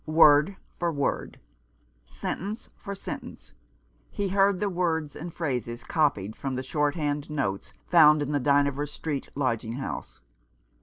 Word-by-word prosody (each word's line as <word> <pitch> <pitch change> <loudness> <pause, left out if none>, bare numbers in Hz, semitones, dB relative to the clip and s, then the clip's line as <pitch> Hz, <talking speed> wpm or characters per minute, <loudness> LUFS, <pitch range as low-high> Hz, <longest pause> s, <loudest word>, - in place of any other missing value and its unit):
Word 155 +2 +6 0.2
for 170 -1 +1
word 140 -3 -2 0.4
— - - -39 0.2
sentence 205 - -5
for 200 -1 -7
sentence 195 - -8 0.3
— - - -38
he 200 -1 +1
heard 195 0 +3
the 210 - 0
words 165 -5 -1
and 170 +3 -6
phrases 125 -8 -3
copied 110 - 0
from 135 -2 -3
the 130 - -3
short 145 +2 0
hand 145 -2 -2
notes 115 -11 -2
found 150 -3 +6
in 145 - -3
the 145 - +1
Dynevor 140 +1 +2
Street 145 -1 -4
lodging 115 -5 -1
house. 130 +2 -6
145 Hz, 150 wpm, -27 LUFS, 135-170 Hz, 0.4 s, Word